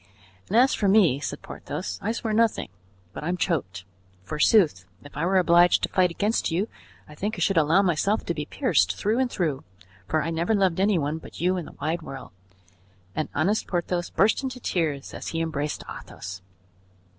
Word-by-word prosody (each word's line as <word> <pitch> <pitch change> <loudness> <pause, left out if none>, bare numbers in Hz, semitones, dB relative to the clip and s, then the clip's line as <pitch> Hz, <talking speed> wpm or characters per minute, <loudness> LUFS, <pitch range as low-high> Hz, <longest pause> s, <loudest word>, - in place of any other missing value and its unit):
"And 215 - +1
as 260 +3 +5
for 205 - 0
me," 190 -9 +5
said 140 - -5
Porthos, 95 0 -6
"I 215 - -1
swear 225 -1 -2
nothing, 225 0 +2 0.4
but - - -7
I'm 175 +3 -1
choked. 105 - -2 0.4
Forsooth! 150 - +3 0.2
If 145 - -13
I 165 +4 0
were 190 +1 +3
obliged 175 -1 +5
to - - +1
fight 185 -1 +3
against 210 +6 0
you, 180 +6 0 0.4
I 150 - -12
think 205 +8 -3
I - - -8
should 190 +3 +2
allow 165 +5 +4
myself 195 +4 +1
to 170 - -1
be 150 -2 -5
pierced 250 - +1
through 220 +4 0
and 260 -1 +1
through, 155 - -2 0.4
for 155 +7 +1
I 165 - -2
never 170 +7 +1
loved 190 -4 +2
any 200 0 +3
one 150 +1 -1
but - - -12
you 180 +2 +2
in 175 -3 -3
the - - -13
wide 160 +4 -1
world;" 135 -4 -9 0.8
and 155 - -2
honest 190 +9 +1
Porthos 175 -1 -1
burst 215 - +2
into 260 -2 -5
tears 155 - -2
as - - -7
he 165 - -2
embraced 150 -2 -2
Athos. 95 0 -8
175 Hz, 190 wpm, -25 LUFS, 150-200 Hz, 0.8 s, as